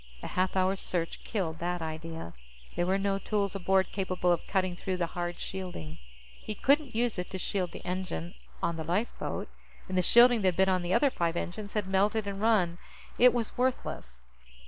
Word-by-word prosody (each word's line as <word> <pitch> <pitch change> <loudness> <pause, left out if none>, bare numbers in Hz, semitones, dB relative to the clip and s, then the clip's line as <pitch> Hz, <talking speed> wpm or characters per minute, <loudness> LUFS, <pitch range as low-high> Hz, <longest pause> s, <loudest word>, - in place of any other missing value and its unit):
A - - -4
half 185 +1 0
hour's 190 +1 +2
search 170 -2 -3
killed 165 -7 -2
that 175 +1 -1
idea. 160 - -6 0.4
There 175 - 0
were 190 +1 +3
no 195 0 0
tools 200 -1 -1
aboard 190 0 +2
capable 185 -2 0
of 170 - 0
cutting 185 -2 0
through 185 +1 -3
the 175 - +1
hard 175 0 -3
shielding. 130 - -6 0.4
He 215 - -5
couldn't 280 0 +2
use 235 -4 +1
it 180 - -4
to 190 - -4
shield 185 -1 -2
the - - -10
engine 180 - -3 0.3
on 170 -1 0
the 160 - -3
lifeboat. 185 +9 -2 0.4
And 185 - -3
the 185 - +4
shielding 235 +4 +6
that 185 -3 +2
been 190 0 +5
on 185 -1 +2
the 175 0 -3
other 280 +8 +4
five 170 -4 0
engines 200 +4 -4
had 210 -3 0
melted 200 +3 +2
and 200 0 -4
run; 190 -6 +3 0.4
it 250 +1 +8
was 235 -3 -2
worthless. 65 - -2
185 Hz, 190 wpm, -30 LUFS, 175-205 Hz, 0.4 s, it